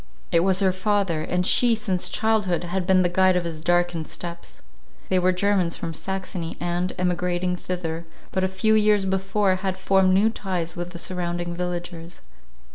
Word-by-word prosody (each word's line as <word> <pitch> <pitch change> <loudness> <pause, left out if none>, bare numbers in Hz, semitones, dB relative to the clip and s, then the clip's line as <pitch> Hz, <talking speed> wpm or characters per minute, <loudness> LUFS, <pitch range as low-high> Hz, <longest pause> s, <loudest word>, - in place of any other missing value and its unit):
It 170 - +4
was 190 +2 +2
her 190 -1 +3
father; 190 -4 0
and 180 +3 -1
she, 235 +4 +5
since 195 -5 -2
childhood, 210 -6 +1
had 180 +1 -3
been 185 -1 +5
the - - +3
guide 185 +1 +3
of 180 - +1
his 165 -2 -5
darkened 175 -1 +1
steps. 170 -1 -8 0.5
They 185 - +3
were 180 +1 +3
Germans 185 -2 +1
from 165 - -4
Saxony, 185 -1 -4
and, 175 +1 -1
emigrating 180 0 0
thither 170 -2 -4 0.2
but 190 - -1
a - - +3
few 190 +4 +1
years 210 -2 +4
before, 190 0 +1
had 190 0 -3
formed 190 0 +3
new 215 +3 +4
ties 180 -6 -3
with 175 0 -4
the 180 - -9
surrounding 175 -1 -3
villagers. 175 -1 -5
180 Hz, 175 wpm, -24 LUFS, 175-190 Hz, 0.5 s, she